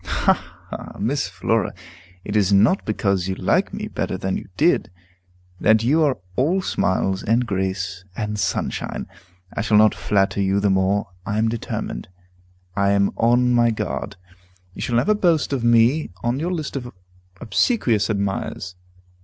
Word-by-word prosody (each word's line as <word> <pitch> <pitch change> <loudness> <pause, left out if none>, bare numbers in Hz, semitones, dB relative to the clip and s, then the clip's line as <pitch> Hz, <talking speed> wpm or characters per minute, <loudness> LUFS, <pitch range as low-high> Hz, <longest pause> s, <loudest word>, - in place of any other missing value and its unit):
"Ha, - - +2 0.4
ha! - - -7
Miss 135 +8 -1
Flora! 95 +2 -1 0.5
It 105 - -5
is 100 -2 +3
not 105 - +4
because 100 -4 0
you 95 - -2
like - - +1
me - - -5
better - - -3
than 95 0 -2
you - - -6
did, 165 -4 +3 0.7
that 110 +1 +4
you 150 +7 +3
are 145 -4 +2 0.2
all 175 +9 +1
smiles, 95 - 0
and 115 +3 +1
grace, 95 -2 -2
and 105 -1 -3
sunshine. - - -2 0.5
I - - -1
shall 110 -1 +3
not 110 0 +6
flatter 100 0 0
you 100 +1 +2
the 100 -1 +2
more, 95 +2 +1
I 105 +2 -2
am 110 +1 +2
determined. 110 - -4 0.7
I 100 0 +2
am 100 0 +2
on 125 +2 +3
my 120 -1 +4
guard. 110 - -3 0.6
You - - -8
shall 120 - -1
never 195 - +3
boast 170 -8 +1
of 130 -4 -1
me 120 +6 +4
on 120 +3 0
your 170 +4 -1
list 155 -6 -4
of 125 -3 -5 0.5
obsequious 115 - +1
admirers. 100 -2 -2
110 Hz, 160 wpm, -22 LUFS, 100-125 Hz, 0.7 s, not